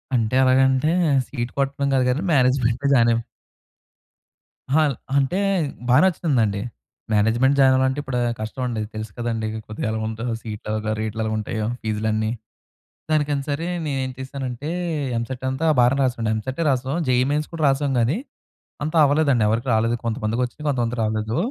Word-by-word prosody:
అంటే 115 +1 +1
ఎలాగంటే 130 +3 +3 0.4
సీట్ 120 -3 -4
కొట్టడం 140 0 0
కాదు 130 -1 +3
కానీ 130 +6 0
మేనేజ్మెంట్‌లో 130 -1 +2
జాయిన్ 120 -3 +5
అయ్యాం. 115 - 0 1.5
హా! 160 - +5 0.4
అంటే 140 +6 +1 0.5
బాగా 130 +4 +6
నచ్చుతుందండి. 130 - +1 0.5
మేనేజ్మెంట్ 115 +6 +3
జాయిన్ 130 -1 +6
అవ్వాలంటే 130 +2 +1
ఇప్పుడు 135 -3 -3 0.2
కష్టం 110 +4 -4
అండి. 115 -3 -2
తెలుసు 110 -1 -5
కదండీ 115 -2 -2 0.2
కొద్దిగా 110 - -5
ఎలా‌గ 110 0 -2
ఉంటాయో 115 +2 -3
సీట్లు 110 -1 -7
ఎలగ, 110 0 -2
రేట్లు 110 0 -3
ఎలా‌గ 110 - -1
ఉంటాయో 110 0 -3 0.2
ఫీజులన్నీ, 110 0 -1 0.8
దానికైనా 145 -2 +1
సరే 150 +4 -2 0.2
నేనేం 135 -3 -2
చేసానంటే, 130 +1 -5 0.5
ఎంసెట్ 125 +2 -5
అంతా 130 +5 -1
బానే 125 +2 +4
రాసాండి. 120 -4 0
ఎంసెట్టే 130 +9 -3
రాసాం. 130 +3 -1
జేఈఈ 125 0 +3
మెయిన్స్ 150 +1 0
కూడా 165 -2 -4
రాసాం 135 +1 +1
కానీ, 125 - +1 0.7
అంతా 155 +2 -3
అవ్వలేదండి. 140 -5 +3
ఎవరికీ 115 +4 -1
రాలేదు 115 +2 +2
కొంతమందికి 115 +1 -1
వచ్చింది. 135 +5 -8
కొంతమందికి 120 -3 -1
రాలేదు. 110 +1 -1
125 Hz, 150 wpm, -22 LUFS, 110-135 Hz, 1.5 s, బాగా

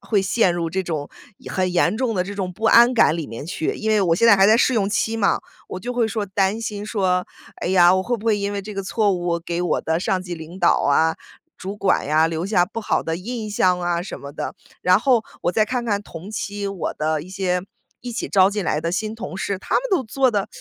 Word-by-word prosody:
会 205 -4 0
陷 190 -2 +2
入 165 -2 -2
这 190 +2 -1
种 155 -5 -4 0.4
很 185 -1 0
严 175 +3 +2
重 245 -4 0
的 180 -1 0
这 200 +1 -6
种 190 -2 -3
不 220 +5 -9
安 240 +2 +6
感 220 -8 +4
里 165 -3 -4
面 115 +4 -7
去。 160 0 -2
因 220 0 -2
为 215 - +3
我 170 -4 +3
现 230 - +3
在 220 - +8
还 195 0 +5
在 220 +2 +6
试 260 - +3
用 205 -5 +1
期 225 +2 0
嘛， 200 - +2 0.3
我 185 - -5
就 245 +6 -5
会 235 -2 +1
说 215 -1 -2
担 195 +2 0
心 210 -2 -4
说， 185 -4 0 0.3
哎 - - -4
呀， 180 -1 +6
我 185 - +1
会 240 +4 -1
不 220 - -12
会 215 -2 +2
因 200 0 -2
为 200 - -3
这 210 - -8
个 195 -1 -4
错 205 +1 +1
误， 175 -1 -3
我 170 0 0
给 170 +1 -3
我 180 - 0
的 160 +1 0
上 185 0 0
级 180 -1 -5
领 160 +3 -10
导 175 -2 +3
啊， 160 +3 +3 0.4
主 195 +2 -6
管 195 -7 +1
呀， 155 +2 +3
留 165 +2 -3
下 185 -4 +3
不 215 +5 -6
好 215 - 0
的 165 0 -2
印 220 +2 -5
象 185 -3 +2
啊 175 -1 -1
什 180 - -7
么 140 0 -9
的， - - -5 0.3
然 180 +2 +4
后 245 -2 +3 0.2
我 175 - +1
再 215 -1 +2
看 245 +1 -2
看 205 -3 0
同 175 +1 -10
期 205 -1 -4
我 195 -3 -4
的 155 0 -1
一 165 - -11
些 185 -1 -1 0.4
一 245 - -6
起 240 - -3
招 190 -1 +4
进 205 -1 -3
来 150 - 0
的 165 +1 -2
新 215 +4 -2
同 225 -4 -7
事， 195 0 -2
他 - - -4
们 - - +3
都 360 -8 +2
做 260 +4 +1
的 205 -3 -1
195 Hz, 280 characters per minute, -22 LUFS, 175-215 Hz, 0.4 s, 在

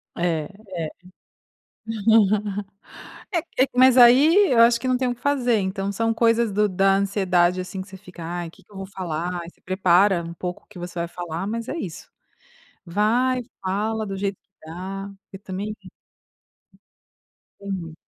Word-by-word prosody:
É 170 -3 0
é 190 -5 -7 2.5
é 340 - +3 0.2
é, 270 - +1
mas 255 0 +6
aí, 290 +11 +7
eu 235 - +4
acho 235 0 +5
que 255 - -4
não 255 - +2
tem 255 0 0
o 245 - 0
que - - -27
fazer. 250 -6 +2
Então, 195 +1 -2
são 225 +3 0
coisas 230 -1 +2
do 210 +1 +2
da 195 +1 +3
ansiedade, 185 -2 +2
assim, 185 +1 -6
que 190 - -10
você 190 - -11
fica: 180 -3 -12
"Ai, 175 0 -4
que 195 +4 -20
que 195 - -30
eu - - -15
vou 195 0 -6
falar", 175 -3 -4
ai, 170 - -9
se - - -34
prepara, 185 -1 +3
um 170 - -7
pouco, 180 +1 -6
o - - -34
que 205 -4 -12
você 175 +1 -7
vai 170 - -1
falar, 175 +1 -5
mas, 230 +3 -4
é - - -3
isso. 180 - -7 0.8
Vai 235 +8 +1 0.2
fala 215 +3 -1
do 195 -1 -5
jeito 195 0 -2
que - - -54 0.2
dá, 195 +4 -6 0.2
porque 195 - -12
também 200 +2 -5 1.8
Entendi. 190 -5 -5
195 Hz, 175 wpm, -23 LUFS, 180-230 Hz, 2.5 s, aí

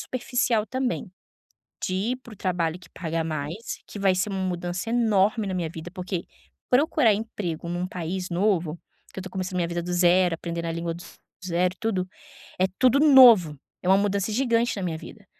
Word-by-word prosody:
superficial 245 -3 0
também, 250 -5 -3 0.7
de 185 - -1 0.2
ir - - -3
para 250 -3 -15
o - - -12
trabalho 175 -2 -1
que 180 - -17
paga 165 -1 -2
mais, 155 +7 -5
que 205 - -9
vai 190 -2 +3
ser 190 +3 0
uma 195 -1 -3
mudança 180 +3 -3
enorme 215 -2 +2
na 190 - -3
minha 170 -3 -2
vida, 165 +1 -8
porque 180 -1 -4 0.4
procurar 265 -4 +4
emprego 200 -6 -4
num 175 +1 -2
país 180 +1 -4
novo, 175 -3 0 0.3
que - - -7
eu - - -7
tô 190 - -7
começando 185 0 -4
minha 170 -1 0
vida 170 0 -3
do 180 +1 -5
zero, 175 0 +4
aprendendo 170 0 -5
a - - -1
língua 170 0 -3
do 175 - -10 0.4
zero, 180 +1 0
tudo, 195 -5 -1 0.5
é 185 - +3
tudo 255 +1 +4
novo, 240 - +7 0.2
é 180 - -2
uma 190 +1 +6
mudança 200 +1 0
gigante 235 0 +1
na 195 - -4
minha 170 -3 -2
vida. 195 +5 -12
185 Hz, 190 wpm, -25 LUFS, 175-215 Hz, 0.7 s, novo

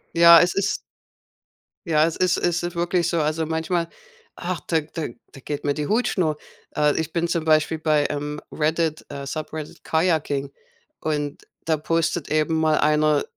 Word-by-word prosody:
Ja, 170 0 +9
es 180 - +1
ist 195 +1 +1 1.1
Ja, 155 -1 +4
es 165 - -1
ist 180 -2 +2
ist 175 0 -1
wirklich 175 0 +1
so, 170 -1 0
also 155 +2 0
manchmal, 165 +2 -1 0.5
ach, 180 -1 -3
da 160 -2 +2
da 155 +1 -5 0.2
da - - -12
geht 145 +2 -5
mir 145 - +1
die 150 0 -3
Hutschnur. 185 -9 +1 0.4
Äh, 150 0 +2
ich 160 0 -3
bin 170 0 0
zum 170 -2 -1
Beispiel 155 0 +2
bei, 150 -2 +2
ähm, 150 0 -4
Reddit, 155 0 -1
äh 140 -1 -6
Subreddit 155 +1 -6
Kajaking 155 -4 0 0.5
und 150 +1 -3 0.2
da 160 -1 +1
postet 165 +1 -1
eben 155 +1 +1
mal 155 -1 +2
einer 150 -1 +3
160 Hz, 160 wpm, -23 LUFS, 150-170 Hz, 1.1 s, Ja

